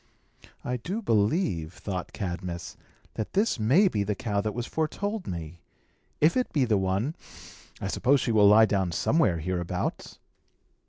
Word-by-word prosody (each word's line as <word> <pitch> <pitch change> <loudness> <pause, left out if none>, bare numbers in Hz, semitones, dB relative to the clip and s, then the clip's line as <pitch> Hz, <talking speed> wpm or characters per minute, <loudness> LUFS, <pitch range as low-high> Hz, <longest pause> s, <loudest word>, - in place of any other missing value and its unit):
"I 125 0 -1
do 185 - -4
believe," 105 - +1
thought 90 -2 -5
Cadmus, 90 -3 -5 0.4
"that 110 - -5
this 205 - +1
may 140 - +4
be 105 - 0
the 105 +1 -2
cow 100 -1 -1
that 105 0 -3
was 120 -1 -3
foretold 200 +8 -3
me. 85 -1 -6 0.6
If 155 +3 +4
it 255 -1 0
be 140 -4 +2
the 110 -4 +2
one, 95 +9 0 0.7
I - - -5
suppose 135 +7 +2
she 120 - -1
will 105 -2 +6
lie 110 +2 +7
down 95 -4 0
somewhere 120 - +2
hereabouts." 85 +1 -3
105 Hz, 155 wpm, -27 LUFS, 95-145 Hz, 0.7 s, lie